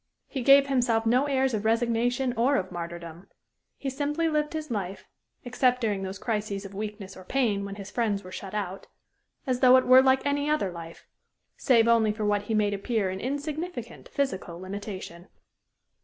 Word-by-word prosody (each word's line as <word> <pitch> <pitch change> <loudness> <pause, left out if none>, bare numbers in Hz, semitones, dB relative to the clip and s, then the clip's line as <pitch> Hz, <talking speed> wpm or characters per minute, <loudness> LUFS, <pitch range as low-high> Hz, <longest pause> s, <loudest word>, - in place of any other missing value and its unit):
He 270 - -5
gave 275 +2 +7
himself 245 -4 +1
no 250 +5 +3
airs 265 -2 +1
of 215 -2 -1
resignation 240 +3 +1
or 250 +5 +2
of 185 -8 -1
martyrdom. 170 +1 -7 0.5
He 270 - -4
simply 295 +4 -1
lived 300 -1 0
his 310 -3 -5
life 195 -3 -4 0.4
except 250 0 +2
during 210 -5 -1
those 190 0 -5
crises 210 -2 -3
of 195 - -9
weakness 205 -1 -6
or 185 - -11
pain 215 -2 0
when 200 0 -6
his 200 -1 -9
friends 210 -4 -1
were 185 - -10
shut 195 +1 -7
out 195 -2 -4 0.6
as 255 -3 0
though 255 0 +7
it 255 - +2
were 255 +1 +8
like 265 0 +3
any 285 +1 0
other 300 -11 +1
life, 165 -1 -10 0.5
save 235 -3 +3
only 230 -2 +4
for 210 0 -3
what 205 0 +1
he 220 - -1
made 205 -1 +2
appear 200 -1 -1
an 190 - -5
insignificant 285 - -5
physical 190 -11 -3
limitation. 185 -2 -7
225 Hz, 180 wpm, -27 LUFS, 195-260 Hz, 0.6 s, were